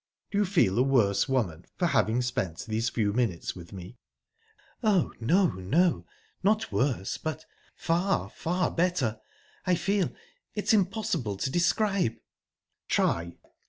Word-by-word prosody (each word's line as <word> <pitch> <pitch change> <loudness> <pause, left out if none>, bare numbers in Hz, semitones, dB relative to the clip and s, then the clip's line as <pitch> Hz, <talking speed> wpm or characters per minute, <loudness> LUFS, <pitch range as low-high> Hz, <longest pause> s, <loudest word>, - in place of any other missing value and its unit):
"Do 200 - +1
you 210 - +3
feel 165 - +2
a - - +6
worse 125 -4 +3
woman 95 -11 -1
for 180 - +1
having 125 -7 +2
spent 120 -5 -2
these 110 +1 -1
few 105 -4 0
minutes 110 -8 -1
with 85 -2 -11
me?" 95 +5 -10 0.8
"Oh, 210 -7 +2
no 175 - +3
no!...Not 180 - 0
worse, 125 -8 0
but, 155 0 -4 0.3
far, 175 +4 0
far 175 +1 -1
better! 165 -11 0 0.5
I 180 - +4
feel...it's 210 - -2
impossible 185 - 0
to 130 +7 -2
describe..." 180 - +2 0.7
"Try!" 85 0 0
140 Hz, 125 wpm, -28 LUFS, 110-185 Hz, 0.8 s, a